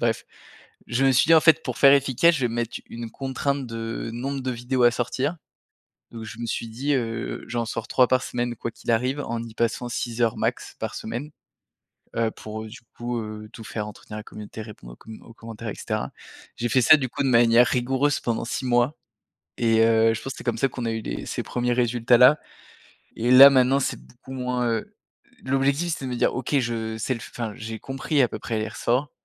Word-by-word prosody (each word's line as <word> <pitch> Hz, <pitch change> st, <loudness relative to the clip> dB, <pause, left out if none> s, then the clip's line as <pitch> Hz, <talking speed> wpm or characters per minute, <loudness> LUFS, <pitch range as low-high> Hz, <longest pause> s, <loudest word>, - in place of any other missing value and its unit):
bref. 115 Hz, -2 st, 0 dB, 0.6 s
Je 120 Hz, +3 st, 0 dB
me 135 Hz, -, +5 dB
suis 130 Hz, -, +4 dB
dit 165 Hz, -, +8 dB
en 160 Hz, -, +7 dB
fait 160 Hz, 0 st, +5 dB
pour -, -, -5 dB
faire 140 Hz, -1 st, +8 dB
efficace, 140 Hz, +5 st, +3 dB
je 150 Hz, -, -2 dB
vais 125 Hz, -, +2 dB
me 115 Hz, -, -5 dB
mettre 120 Hz, 0 st, -2 dB
une 115 Hz, -1 st, -7 dB
contrainte 135 Hz, +1 st, -2 dB
de 115 Hz, 0 st, -5 dB
nombre 135 Hz, +4 st, -3 dB
de 130 Hz, -, -2 dB
vidéos 125 Hz, +1 st, -1 dB
à 120 Hz, -, +7 dB
sortir. 130 Hz, +6 st, -2 dB, 0.8 s
Donc 115 Hz, -1 st, -8 dB
je 105 Hz, 0 st, -9 dB
me 120 Hz, -, -3 dB
suis 115 Hz, +1 st, -3 dB
dit, 135 Hz, +6 st, -1 dB
heu: 115 Hz, -3 st, -3 dB
«J'en 120 Hz, -1 st, -2 dB
sors 115 Hz, 0 st, -5 dB
3 125 Hz, -1 st, +4 dB
par 130 Hz, 0 st, +2 dB
semaine 120 Hz, 0 st, -3 dB
quoi 115 Hz, -, -4 dB
qu'il 115 Hz, -, -4 dB
arrive, 130 Hz, +5 st, 0 dB
en 115 Hz, -4 st, -3 dB
y 115 Hz, -1 st, -10 dB
passant 120 Hz, +1 st, -1 dB
6 120 Hz, 0 st, -3 dB
heures 115 Hz, -2 st, +2 dB
max -, -, -2 dB
par -, -, -4 dB
semaine». 120 Hz, +7 st, -5 dB, 0.8 s
Heu, 115 Hz, -1 st, +1 dB
pour 110 Hz, 0 st, -7 dB
du 110 Hz, +2 st, -10 dB, 0.2 s
coup, 120 Hz, 0 st, -3 dB
heu, 110 Hz, 0 st, -7 dB
tout 115 Hz, -, -10 dB
faire, 105 Hz, 0 st, -5 dB
entretenir 105 Hz, 0 st, -10 dB
la 110 Hz, -, -7 dB
communauté, 105 Hz, +1 st, -9 dB
répondre 100 Hz, -, -11 dB
aux -, -, -13 dB
com 110 Hz, -1 st, -12 dB
aux 115 Hz, -, -14 dB
commentaires, 115 Hz, 0 st, -8 dB
et -, -, -5 dB
cetera. -, -, -3 dB, 0.4 s
J'ai 120 Hz, -, -2 dB
fait 130 Hz, +3 st, +3 dB
ça 155 Hz, -, +8 dB
du 135 Hz, -3 st, -2 dB
coup -, -, -4 dB
de -, -, +1 dB
manière 120 Hz, 0 st, +5 dB
rigoureuse 130 Hz, +4 st, +1 dB
pendant 115 Hz, -1 st, -2 dB
6 125 Hz, -, -3 dB
mois, 120 Hz, +3 st, +2 dB, 0.6 s
et 115 Hz, -1 st, +3 dB
heu, 115 Hz, 0 st, +4 dB
je -, -, -6 dB
pense 135 Hz, -, -5 dB
que -, -, -15 dB
c'est -, -, -9 dB
comme 120 Hz, -2 st, 0 dB
ça 135 Hz, -, +2 dB
qu'on 120 Hz, -1 st, -5 dB
a 115 Hz, -, 0 dB
eu 110 Hz, 0 st, -3 dB
les -, -, -5 dB
ces -, -, -3 dB
premiers 125 Hz, 0 st, -1 dB
résultats 120 Hz, 0 st, +3 dB
là 130 Hz, +5 st, +7 dB, 0.8 s
et 120 Hz, +2 st, 0 dB
là, 135 Hz, +2 st, +11 dB
maintenant, 135 Hz, 0 st, +4 dB
c'est 135 Hz, -, -2 dB
beaucoup 125 Hz, +2 st, -14 dB
moins 125 Hz, -1 st, -1 dB
heu, 115 Hz, -1 st, -3 dB, 0.5 s
l'objectif, 140 Hz, +5 st, +1 dB
c'est 135 Hz, -, -6 dB
de 130 Hz, -, -4 dB
me -, -, -2 dB
dire: -, -, +1 dB
«OK, 130 Hz, +3 st, 0 dB
je 115 Hz, -2 st, -3 dB
sais 130 Hz, +4 st, -1 dB
le -, -, -7 dB
fai -, -, -10 dB
enfin 115 Hz, -3 st, -4 dB
j'ai 110 Hz, 0 st, -7 dB
compris 135 Hz, +4 st, -1 dB
à 125 Hz, -, +4 dB
peu 110 Hz, -, -6 dB
près 110 Hz, 0 st, -3 dB
les 110 Hz, -, -2 dB
ressorts». 125 Hz, +5 st, -1 dB
120 Hz, 230 wpm, -24 LUFS, 115-130 Hz, 0.8 s, là